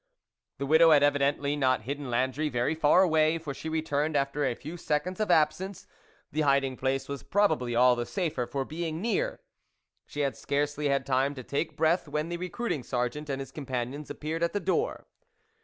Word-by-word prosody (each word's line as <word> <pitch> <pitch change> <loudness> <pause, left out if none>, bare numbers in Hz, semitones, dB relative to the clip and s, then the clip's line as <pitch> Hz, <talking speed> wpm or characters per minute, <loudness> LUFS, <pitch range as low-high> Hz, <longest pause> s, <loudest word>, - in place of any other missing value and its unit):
The 140 - -3
widow 160 +3 +6
had 145 -2 +6
evidently 145 0 +2
not 130 -4 +2
hidden 140 +2 -4
Landry 130 +5 0
very 125 +3 0
far 160 +4 +4
away, 160 -2 +3
for 155 -4 -6
she 160 - -6
returned 155 -1 0
after 140 +1 0
a 120 - 0
few 155 +7 -8
seconds 175 +3 -2
of 215 - 0
absence; 170 +5 +1 0.5
the 155 - 0
hiding 140 -2 +2
place 135 +1 -1
was 140 -1 -5
probably 125 - +1
all 125 +1 +5
the 120 0 -3
safer 155 -10 -2
for 135 -1 -3
being 160 +1 -4
near. 425 - -1 0.7
She 145 - -4
had 140 -2 0
scarcely 145 +1 -1
had 140 -1 +1
time 135 +1 +1
to 130 - -7
take 140 +6 -3
breath 160 +2 +2
when 150 +3 -2
the 175 - -3
recruiting 180 - -3
sergeant 125 +5 -3
and 135 -1 -2
his 135 - -7
companions 135 0 -4
appeared 160 +2 -4
at 170 - +1
the 205 - 0
door. 190 0 -1
145 Hz, 190 wpm, -28 LUFS, 135-160 Hz, 0.7 s, widow